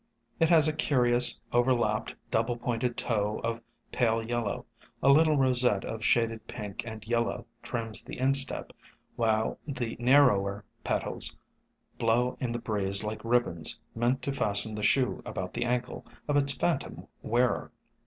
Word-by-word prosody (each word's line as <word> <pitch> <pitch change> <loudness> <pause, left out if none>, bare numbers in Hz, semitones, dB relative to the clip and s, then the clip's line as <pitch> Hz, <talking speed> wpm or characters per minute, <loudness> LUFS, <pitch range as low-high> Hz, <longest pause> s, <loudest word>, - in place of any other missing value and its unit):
It 165 -1 +3
has 160 -3 +5
a 155 - 0
curious, 125 -5 +4
overlapped, 120 0 +1 0.2
double 115 +2 0
pointed 120 0 -2
toe 105 -2 -1
of 115 0 -3 0.3
pale 115 -2 0
yellow; 115 -3 -3 0.4
a 135 - +4
little 155 +2 +5
rosette 125 -6 +4
of 110 -1 -6
shaded 115 -1 0
pink 105 -4 -6
and 110 -1 -8
yellow 115 0 -1 0.2
trims 115 -2 -1
the - - -9
instep, 135 +1 +1 0.4
while 110 -1 0
the 120 -5 -4
narrower 110 -7 +3 0.2
petals - - -2 0.6
blow 120 +2 +1
in 125 -3 -3
the 120 - -2
breeze 100 -3 +1
like 105 0 -5
ribbons 115 -9 +1
meant 120 +3 -1
to 140 - -2
fasten 110 -3 +3
the 105 - -5
shoe 125 +4 +1
about - - -6
the - - -2
ankle 125 0 -3 0.2
of 145 - 0
its 140 -1 +3
phantom 140 +3 -3 0.2
wearer. 120 +2 0
120 Hz, 145 wpm, -28 LUFS, 110-130 Hz, 0.6 s, has